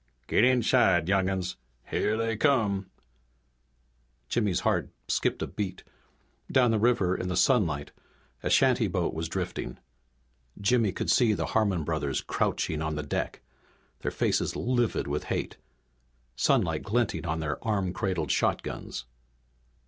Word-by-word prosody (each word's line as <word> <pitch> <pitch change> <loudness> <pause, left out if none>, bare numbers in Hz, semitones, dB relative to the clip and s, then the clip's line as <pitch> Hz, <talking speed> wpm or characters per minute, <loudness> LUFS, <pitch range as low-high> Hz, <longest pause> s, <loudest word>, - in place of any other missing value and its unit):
"Git 105 - +3
inside, 120 -9 +4
young 95 -1 +2
'uns. 95 -2 -3 0.3
Here 105 +1 +1
they 115 0 0
come!" 105 -7 +1 1.4
Jimmy's 105 -6 +1
heart - - +1 0.2
skipped - - 0
a - - 0
beat. 95 0 -5 0.7
Down 125 -3 +4
the 110 - +2
river 105 -6 +2
in 90 - -3
the 90 - -1
sunlight 85 - +2 0.5
a - - -2
shantyboat - - +2
was 80 +1 -3
drifting. 60 - -4 0.8
Jimmy 110 0 +2
could 85 - -1
see 110 +4 +4
the - - -1
Harmon 100 -7 +2
brothers 75 -3 -1
crouching 80 -1 -1
on 80 0 -2
the 75 - -3
deck, 75 - -3 0.6
their - - -2
faces - - 0
livid 120 -2 0
with 70 +1 -3
hate, - - -3 0.8
sunlight - - +2
glinting 115 -5 -1
on 80 0 -1
their 75 -2 -3
arm 100 -5 0
cradled 90 -4 -1
shotguns. - - -1
95 Hz, 135 wpm, -28 LUFS, 80-115 Hz, 1.4 s, inside